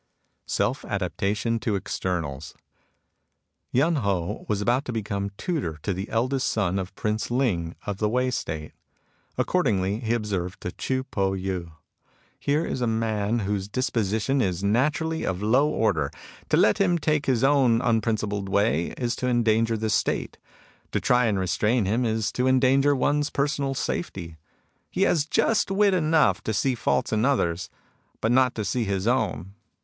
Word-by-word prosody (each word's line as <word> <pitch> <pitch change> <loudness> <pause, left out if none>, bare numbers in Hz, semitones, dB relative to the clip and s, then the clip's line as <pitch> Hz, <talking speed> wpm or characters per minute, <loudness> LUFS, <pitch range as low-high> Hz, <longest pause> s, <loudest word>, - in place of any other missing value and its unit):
SELF - - 0
ADAPTATION 110 +3 -1
TO 110 -2 -1
EXTERNALS 80 -7 -3 1.2
Yen 155 +6 +2
Ho 95 -8 -2
was 105 -2 +1
about 120 +6 +1
to - - -3
become 100 -3 -2
tutor 140 - -2
to 100 - 0
the 95 +3 -5
eldest 130 +4 0
son 100 -3 0
of 95 0 -6
Prince 105 +1 -2
Ling 105 -10 0
of 100 -2 -3
the 105 - +1
Wei 125 +2 +1
State. 80 -10 -4 0.7
Accordingly 105 - +1
he 115 -1 0
observed 95 -4 -3
to 90 - -4
Chii 130 +6 -2
Po 95 -1 0
Yii: 95 -3 -3 0.3
" - - -39 0.3
Here 150 +3 +1
is 130 - -3
a 120 - +1
man 110 0 0
whose 100 -1 -2
disposition 115 +2 0
is 95 -3 -1
naturally 150 +9 +1
of 95 +1 -2
a - - 0
low 135 +7 +4
order. 115 -7 +1 0.4
To - - +3
let 110 - +4
him 180 -3 +3
take 155 -2 0
his 130 -2 +2
own 135 -5 +4
unprincipled 110 -4 0
way 100 -4 +1
is 120 -1 -1
to 125 - -2
endanger 115 -2 +2
the 110 0 -1
State. - - -1 0.5
To - - +2
try 125 -2 +3
to 100 - 0
restrain 105 +5 +1
him 115 +6 +1
is 110 -1 0
to 125 +3 0
endanger 135 +2 +4
one's 145 +2 +1
personal 140 -1 -1
safety. 85 - -4 0.5
He 190 - 0
has 160 -6 +2
just 220 +5 +2
wit 200 0 +3
enough 160 -3 +3
to 110 - -1
see 130 +7 +1
faults 115 - 0
in 110 0 +2
others, 95 -9 +1 0.5
but 110 - +1
not 130 0 +3
to 110 - -3
see 115 +4 0
his 100 -1 -1
own. 100 - 0
110 Hz, 165 wpm, -25 LUFS, 100-130 Hz, 1.2 s, low